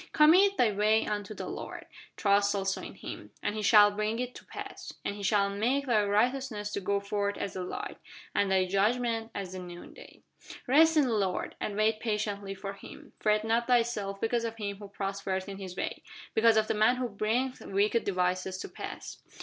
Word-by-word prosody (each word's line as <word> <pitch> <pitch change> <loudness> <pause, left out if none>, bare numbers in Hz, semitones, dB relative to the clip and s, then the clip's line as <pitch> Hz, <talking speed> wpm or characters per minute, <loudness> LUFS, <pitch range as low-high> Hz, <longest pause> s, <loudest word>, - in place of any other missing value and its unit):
Commit 370 +6 +6
thy 230 -3 +4
way 210 +2 +3
unto 210 0 -3
the - - -5
Lord, - - -6 0.3
Trust 200 0 +3
also 195 -1 -1
in - - -8
Him, - - -8
And - - 0
He 215 - -3
shall 210 -1 +7
bring 215 +2 -1
it 250 0 -3
to - - -12
pass. - - -8
And 200 - -2
He 205 - -8
shall 200 -1 +2
make 245 +8 0
thy 225 -5 +3
righteousness 215 0 0
to 200 - -3
go 200 +1 +1
forth 200 0 -2
as 200 - -4
the 185 - -4
light, 180 - -6 0.3
And 200 - +2
thy 190 -1 +3
judgment 225 +4 +1
as 195 -2 -4
the 185 - -5
noonday. 175 -1 -11 0.4
Rest 320 +5 +5
in 300 - +6
the 250 -4 0
Lord, 195 -4 -1
And 205 - -3
wait 215 +1 +2
patiently 205 -3 -2
for 195 +1 -6
Him: 200 - -13
Fret 215 0 +2
not 230 +1 +1
thyself 230 -5 +1
because 230 +2 0
of 225 -1 -3
him 200 -3 -4
who 205 0 -9
prospereth 195 -1 -3
in 195 -1 -7
his 185 -2 -7
way, - - -3 0.3
Because 225 0 +5
of 215 - +4
the - - 0
man 215 +3 +4
who 250 0 -2
bringeth 235 +5 -1
wicked 205 +4 +1
devices 185 0 0
to - - -6
pass. - - -7
210 Hz, 200 wpm, -30 LUFS, 200-230 Hz, 0.4 s, shall